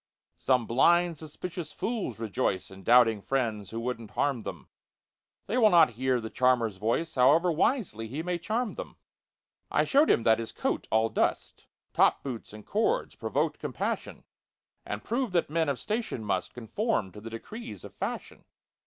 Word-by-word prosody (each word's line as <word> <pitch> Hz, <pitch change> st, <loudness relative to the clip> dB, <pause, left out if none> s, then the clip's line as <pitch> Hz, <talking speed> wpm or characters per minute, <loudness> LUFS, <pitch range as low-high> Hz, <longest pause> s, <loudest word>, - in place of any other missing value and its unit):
Some 125 Hz, -3 st, +2 dB
blind, 170 Hz, +9 st, +4 dB
suspicious 160 Hz, +1 st, -6 dB
fools 215 Hz, -, -3 dB
rejoice 95 Hz, -4 st, -2 dB
In 95 Hz, 0 st, -11 dB
doubting 115 Hz, -1 st, +5 dB
friends 110 Hz, -6 st, -1 dB
who 115 Hz, -, -5 dB
wouldn't 115 Hz, -2 st, -4 dB
harm 135 Hz, -1 st, 0 dB
them; -, -, -7 dB, 0.8 s
They 235 Hz, +5 st, 0 dB
will 220 Hz, -3 st, +7 dB
not 170 Hz, -9 st, +6 dB
hear 130 Hz, +2 st, 0 dB
the 110 Hz, -1 st, -6 dB
charmer's 125 Hz, -5 st, +2 dB
voice, 115 Hz, -, -1 dB
However 145 Hz, +8 st, +5 dB
wisely 160 Hz, -, 0 dB
he 140 Hz, +8 st, -4 dB
may 175 Hz, 0 st, -2 dB
charm 220 Hz, +6 st, -1 dB
them! -, -, -8 dB, 0.7 s
I -, -, +2 dB
showed 290 Hz, +3 st, +4 dB
him 115 Hz, -, +4 dB
that 110 Hz, 0 st, +4 dB
his 115 Hz, -, -5 dB
coat, -, -, -2 dB
all 110 Hz, +1 st, +3 dB
dust, -, -, -1 dB, 0.3 s
Top -, -, +3 dB
boots 125 Hz, -5 st, -6 dB
and 105 Hz, 0 st, -11 dB
cords 425 Hz, -, 0 dB
provoked -, -, -1 dB
compassion, -, -, -4 dB, 0.6 s
And -, -, -4 dB
proved 240 Hz, -3 st, -1 dB
that 170 Hz, -4 st, +1 dB
men 160 Hz, -1 st, +1 dB
of 140 Hz, -, -1 dB
station 215 Hz, -, -3 dB
must 95 Hz, -3 st, -2 dB
Conform 120 Hz, -, -1 dB
to 105 Hz, -, -11 dB
the 115 Hz, -, -7 dB
decrees 220 Hz, -, -8 dB
of -, -, -10 dB
fashion. -, -, -5 dB
130 Hz, 165 wpm, -28 LUFS, 115-175 Hz, 0.8 s, will